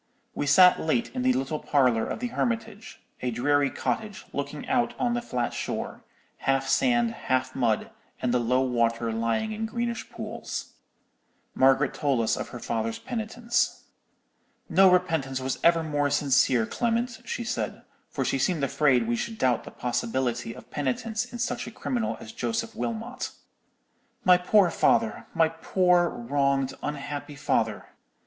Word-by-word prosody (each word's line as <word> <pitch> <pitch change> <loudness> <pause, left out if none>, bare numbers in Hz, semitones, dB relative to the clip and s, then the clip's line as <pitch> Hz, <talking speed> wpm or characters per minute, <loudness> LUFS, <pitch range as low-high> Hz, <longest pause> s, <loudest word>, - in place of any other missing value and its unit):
We 145 - -2
sat 180 +5 +7
late 195 +9 0
in 255 - -2
the 255 0 +3
little 145 - -2
parlour 125 -6 +2
of - - -4
the 245 - -2
Hermitage; 225 -3 -3 0.2
a 125 - -1
dreary 140 +4 +2
cottage, 210 +6 -3
looking 140 +1 -4
out 245 -2 +1
on 245 -1 +1
the 240 - -1
flat 125 - -2
shore, - - -4 0.3
half 135 0 0
sand, 240 - +3
half 130 - -1
mud, 115 -5 0 0.3
and 125 -1 0
the 125 - +3
low 125 +2 +2
water 115 -2 0
lying 115 - 0
in 220 +1 -3
greenish 235 +1 -3
pools. - - -6 0.8
Margaret 135 +1 +4
told 140 -5 +1
us 115 0 +1
of - - -4
her - - -7
father's 115 -1 -2
penitence. 235 0 -1 0.8
"'No 190 +1 +6
repentance 160 -8 +1
was 130 0 -3
ever 165 -1 +5
more 145 -2 0
sincere, 135 -4 +3
Clement,' 235 - -1
she 235 - -3
said, 235 0 -3 0.3
for 135 - -2
she 135 - 0
seemed 155 +2 +1
afraid 130 -4 +3
we 120 - +1
should 225 - -4
doubt 125 - +1
the - - -7
possibility 120 -1 -2
of - - -14
penitence 215 - -1
in 245 - -9
such 245 0 -2
a - - -7
criminal 235 0 -2
as - - -9
Joseph 230 0 -2
Wilmot. 235 +2 -4 1.0
'My 180 -1 +7
poor 185 0 +4
father—my 220 -8 +2
poor 175 +1 +2
wronged, 135 +2 0
unhappy 145 0 -5
father! 135 - -1
150 Hz, 155 wpm, -27 LUFS, -, 1.0 s, sat